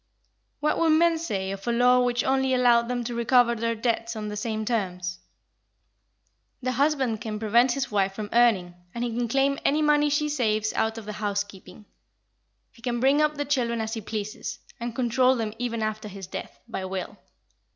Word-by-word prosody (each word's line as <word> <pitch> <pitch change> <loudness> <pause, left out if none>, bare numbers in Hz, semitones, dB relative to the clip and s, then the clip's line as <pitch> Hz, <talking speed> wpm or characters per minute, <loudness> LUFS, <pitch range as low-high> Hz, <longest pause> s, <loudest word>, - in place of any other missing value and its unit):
What 300 - +1
would 330 - +3
men 330 +1 +4
say 195 - -2
of 195 +3 -7
a - - +2
law 250 +1 +4
which 245 0 +1
only 265 0 +2
allowed 240 -2 +4
them 245 0 -2
to 240 +1 -4
recover 235 +1 +3
their 230 0 -1
debts 230 0 -1
on 210 -1 -4
the 210 - -5
same 215 0 -3
terms? 180 -6 -2 1.4
The 255 -1 -2
husband 265 -4 +1
can 215 -1 -4
prevent 235 +4 +3
his 270 -2 -3
wife 195 -2 +1
from 210 0 -6
earning, 220 -7 +3 0.2
and 235 - -2
he 235 -2 -2
can 240 0 0
claim 275 +3 +1
any 300 +2 +2
money 295 0 +4
she 300 +1 +1
saves 220 -7 0
out 220 +1 0
of 225 - -7
the 210 - -5
housekeeping. 205 -1 -4 0.9
He 230 - -20
can 240 -1 -2
bring 275 +4 +4
up 300 0 +2
the 290 0 -2
children 245 -5 0
as 220 0 -3
he 225 - -4
pleases, 215 -1 -5 0.2
and 235 -1 -4
control 255 +1 +3
them 220 -3 -3
even 230 -2 -2
after 215 0 -3
his 195 -1 -8
death, 180 - -8
by 190 - -4
will. 190 0 -5
235 Hz, 195 wpm, -26 LUFS, 215-255 Hz, 1.4 s, men